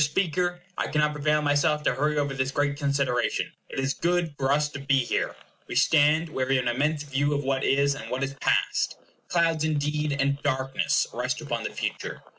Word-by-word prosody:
Speaker, 175 +3 0 0.2
I - - 0
cannot 150 0 +1
prevail 150 +1 +1
on 150 - -1
myself 150 +1 +2
to - - +2
hurry 150 +4 0
over 140 -1 0
this 130 -1 -1
great 140 +1 0
consideration. 140 -3 0 0.2
IT - - -8
IS 135 +1 0
GOOD 175 -2 0
FOR 135 -1 0
US 150 +1 +3
TO 145 - -8
BE 140 0 +2
HERE. - - -1 0.3
We - - -6
stand 155 +2 +4
where 130 -4 -2
we 135 - +2
have 130 -1 +1
an 120 -1 0
immense 150 +2 0
view 145 +1 0
of 145 - -1
what 135 0 0
is, 140 +1 +3
and 145 - -8
what 130 +2 -2
is 135 0 -2
past. - - +1 0.3
Clouds, 165 -2 +2
indeed, 150 -1 0
and 140 +1 +1
darkness, 130 0 +1
rest - - -2
upon - - -3
the - - -3
future. - - -4
145 Hz, 210 wpm, -26 LUFS, 135-150 Hz, 0.3 s, stand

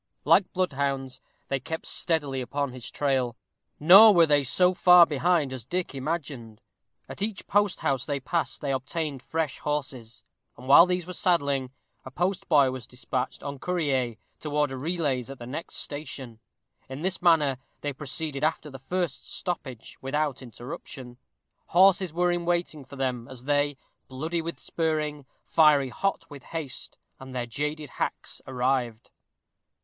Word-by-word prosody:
Like 195 - +4
bloodhounds, 135 -7 -2 0.3
they 135 - -1
kept 160 +5 -5
steadily 145 -6 0
upon 140 +2 -2
his 125 -2 -8
trail; 130 -4 0 0.4
nor 195 +7 +9
were 170 -1 +7
they 145 -2 +3
so 180 +7 +3
far 180 -1 +7
behind 155 -2 +1
as 130 -3 -5
Dick 180 +8 -2
imagined. 135 -6 -4 0.5
At - - -8
each 210 -1 -2
post 205 -1 +1
house 135 -3 0
they 145 -2 -1
passed 165 +5 -2
they 140 - -1
obtained 140 +1 -3
fresh 160 0 -3
horses, 130 -6 -4 0.3
and, 125 - -11
while 165 +6 +8
these 180 -1 -1
were 180 - -7
saddling, 140 -8 +1 0.3
a - - -8
postboy 170 -4 +2
was 130 -2 -7
despatched 125 0 -4
en 140 -1 -6
courrier 140 -10 -1 0.2
to 155 - -5
order 145 -2 0
relays 140 -4 -1
at 135 - -8
the 120 - -9
next 140 +7 -6
station. 135 -6 -5 0.5
In 135 +4 -7
this 190 0 -1
manner 150 -7 +3 0.2
they 145 -1 -3
proceeded 145 +1 -3
after 155 -1 -1
the 135 - -9
first 175 +1 -3
stoppage 130 - -5
without 145 0 -1
interruption. 125 +1 -9 0.5
Horses 190 0 +4
were 175 +2 +1
in 175 0 -1
waiting 170 -4 -1
for 135 - -12
them, 125 -3 -2
as 130 -1 -9
they, 145 0 +1 0.3
"bloody 160 +6 -3
with 165 +1 -5
spurring, 150 -3 -2 0.2
fiery 150 -4 +4
hot 195 +10 -2
with 145 -2 -11
haste," 155 -2 -6 0.2
and 130 -1 -10
their 125 -1 -1
jaded 150 +4 -4
hacks - - -4
arrived. 125 -3 -1
145 Hz, 155 wpm, -27 LUFS, 130-165 Hz, 0.5 s, nor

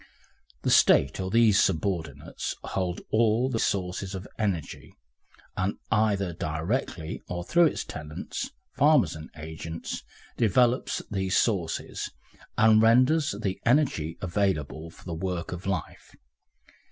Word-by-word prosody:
The - - +1
State 70 +6 +5
or 95 0 -2
these 110 -1 +5
subordinates 80 -5 -2
holds 90 -2 -3
all 115 +3 +3
the 115 - -1
sources 95 0 -1
of 95 +1 -7
energy, 95 -8 -3 0.6
and 95 +2 -1
either 100 -4 +2
directly 80 +1 -3
or 90 0 -4
through 170 - +4
its - - -2
tenants, 75 0 -6 0.3
farmers 140 - +4
and 80 0 -9
agents, 80 +1 -6 0.4
develops 120 +3 +2
these 95 -2 0
sources, 95 -8 -1 0.5
and 110 -1 +6
renders 130 +4 +4
the 95 -2 -2
energy 115 - +1
available 85 -4 -1
for - - -17
the 85 - -4
work 85 0 -3
of 90 +2 -6
life. 95 -2 -4
95 Hz, 120 wpm, -27 LUFS, 85-110 Hz, 0.6 s, and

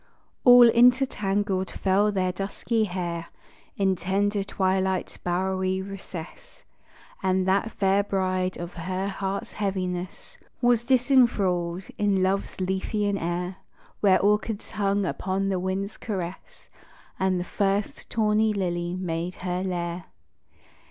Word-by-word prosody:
All 245 -1 +9
intertangled 210 -6 +3
fell 200 +2 +2
their 185 -2 0
dusky 205 +4 -1
hair 175 -3 -4 0.5
In 195 -1 +2
tender 200 +3 0
twilight's 190 -1 -1
bowery 185 +1 -1
recess; 195 - -9 0.6
And 185 0 +1
that 200 +4 +2
fair 195 0 +2
bride 185 -2 -1
of 175 0 -6
her 185 +3 -3
heart 195 0 -3
heaviness 185 -3 -4 0.2
Was 240 -2 +3
disenthralled 225 -9 +2 0.2
in 200 -2 +2
love's 195 +1 -1
Lethean 195 +2 -1
air, 175 +2 -3 0.4
Where 195 -3 +4
orchids 210 +1 0
hung 200 -1 0
upon 190 +2 -1
the 190 -2 0
wind's 190 +2 -3
caress, 190 -4 -6 0.5
And 190 -1 +1
the - - -2
first 200 +1 -1
tawny 215 -1 +2
lily 175 -3 -2
made 175 -1 -3
her 180 0 -1
lair. 175 -2 -3
190 Hz, 115 wpm, -26 LUFS, 185-205 Hz, 0.6 s, All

